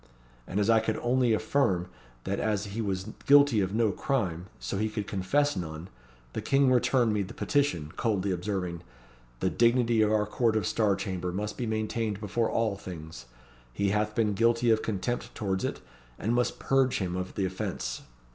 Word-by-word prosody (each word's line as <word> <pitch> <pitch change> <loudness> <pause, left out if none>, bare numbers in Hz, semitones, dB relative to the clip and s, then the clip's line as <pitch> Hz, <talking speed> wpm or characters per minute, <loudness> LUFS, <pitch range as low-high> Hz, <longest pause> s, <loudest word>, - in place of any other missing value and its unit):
And 95 - -2
as 105 - +2
I 115 -1 +5
could 110 0 -1
only 125 0 +2
affirm, 105 -5 +1 0.4
that - - -2
as 105 -1 0
he 115 - -2
was 95 -1 -2 0.2
guilty 140 -6 +6
of 95 0 -1
no 110 -2 +3
crime, 95 -8 -2
so 95 - -3
he 110 +1 0
could 105 -1 -4
confess 135 +11 +1
none, 80 -1 -5 0.4
the - - -3
King 135 -1 +3
returned 125 -2 +3
me 105 - +1
the 95 - -6
petition, 115 - 0
coldly 100 -4 0
observing 90 -2 -3 0.6
'The - - +1
dignity 120 -1 +3
of 105 0 +3
our 105 -1 +2
Court 110 +1 +1
of 110 - +1
Star 105 -3 +2
Chamber 90 -2 -3
must 105 +3 -3
be 120 - -3
maintained 110 -1 -2
before 110 +2 -1
all 110 -3 0
things. 80 -9 -9 0.5
He 100 +9 0
hath 105 +1 0
been 110 -3 +2
guilty 115 +2 +3
of 110 0 +3
contempt 110 +3 -3
towards 95 -2 -1
it, - - -3 0.4
and 115 - -1
must 120 0 +1
purge 135 -1 +2
him 90 -2 -2
of 90 0 -4
the 95 - 0
offence.' 90 -9 -3
105 Hz, 185 wpm, -28 LUFS, 95-115 Hz, 0.6 s, guilty